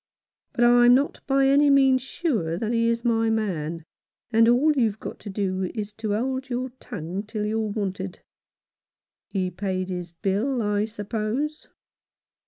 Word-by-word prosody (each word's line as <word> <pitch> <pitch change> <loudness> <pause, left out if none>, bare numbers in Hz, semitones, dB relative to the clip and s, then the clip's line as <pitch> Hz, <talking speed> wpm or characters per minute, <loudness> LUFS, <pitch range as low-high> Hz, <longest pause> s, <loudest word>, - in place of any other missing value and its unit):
But 240 - +1
I'm 240 0 +7
not 280 +3 0
by 270 0 +3
any 285 +2 +5
means 270 -2 +5
sure 230 - -2
that 225 +4 -2
he 230 0 +2
is 230 +1 0
my 225 -1 +2
man, 170 -7 -2 0.5
and 230 0 +5
all 275 +6 +4
you've 225 -6 +1
got - - -7
to 210 - -8
do 190 -2 -2
is 210 -1 -4
to 215 -2 -1
hold 260 +3 -2
your 255 +1 -2
tongue 185 -4 -5
till 210 0 -4
you're 220 +1 -1
wanted. 195 -2 -4 1.1
He 185 -2 -2
paid 185 0 -3
his 180 -2 -5
bill, 210 +9 -1
I 205 0 +1
suppose 225 +7 -3
220 Hz, 155 wpm, -25 LUFS, 195-250 Hz, 1.1 s, I'm